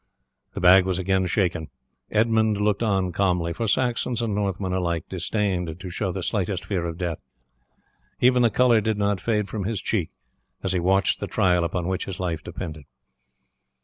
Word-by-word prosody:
The - - -3
bag 90 +1 +7
was 95 -2 0
again 95 0 +1
shaken. 90 -4 0 0.4
Edmund 110 -1 +2
looked 105 0 +1
on 95 -5 +1
calmly, 90 -2 0
for 115 +4 -2
Saxons 120 +1 0
and 115 -3 -1
Northmen 100 -2 -1
alike 85 -3 -1
disdained 90 -3 -2
to 90 0 -7
show 95 +2 -2
the 95 0 -4
slightest 95 -3 -2
fear 90 -4 -2
of 85 -1 -5
death; 85 -3 -3 1.0
even 125 0 +4
the 120 - +5
colour 120 0 +4
did 110 0 -1
not 100 -1 0
fade 105 -3 0
from 100 +1 -4
his 110 -1 -2
cheek 95 -5 -1 0.5
as 95 - 0
he 95 - +1
watched 95 +3 +2
the - - -3
trial 90 -2 +2
upon 85 +1 -2
which 95 0 -2
his 95 - -6
life 85 -4 -2
depended. 80 -5 -7
95 Hz, 180 wpm, -24 LUFS, 90-105 Hz, 1.0 s, bag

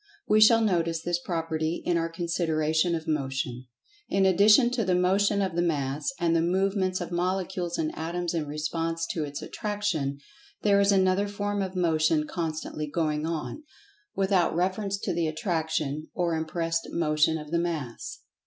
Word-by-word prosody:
We 215 +1 +4
shall 225 +1 +7
notice 170 -6 +1
this 175 0 0
property 165 -2 -2
in 175 - +1
our 165 0 0
consideration 165 -1 0
of 160 -1 -5
Motion.[Pg 135 -4 -2 0.4
78] - - -1
In 195 - +4
addition 210 +6 +6
to 245 -2 0
the 185 -2 +1
Motion 200 +3 +2
of 185 -3 -2
the 175 - +2
Mass, 150 - -1
and 170 -1 +2
the 165 - +3
movements 185 +1 +1
of 175 - -5
Molecules 180 0 -1
and 155 -1 -2
Atoms 170 +2 -3
in 160 -3 -2
response 165 +3 -2
to 160 - -2
its 145 -1 -6
Attraction, 205 -10 -2 0.5
there 200 -1 +4
is 200 0 +4
another 190 +1 +3
form 205 0 -2
of 190 -1 -4
Motion 160 -3 +2
constantly 155 -2 -4
going 155 0 -1
on, 165 - -4 0.5
without 190 -4 +2
reference 195 +3 0
to - - -3
the 165 -1 0
Attraction 155 -3 -2
or 175 -2 0
impressed 165 +1 -2
Motion 160 -1 +2
of 150 -1 -9
the 170 - +2
Mass. 160 -8 -4
170 Hz, 165 wpm, -27 LUFS, 155-190 Hz, 0.5 s, shall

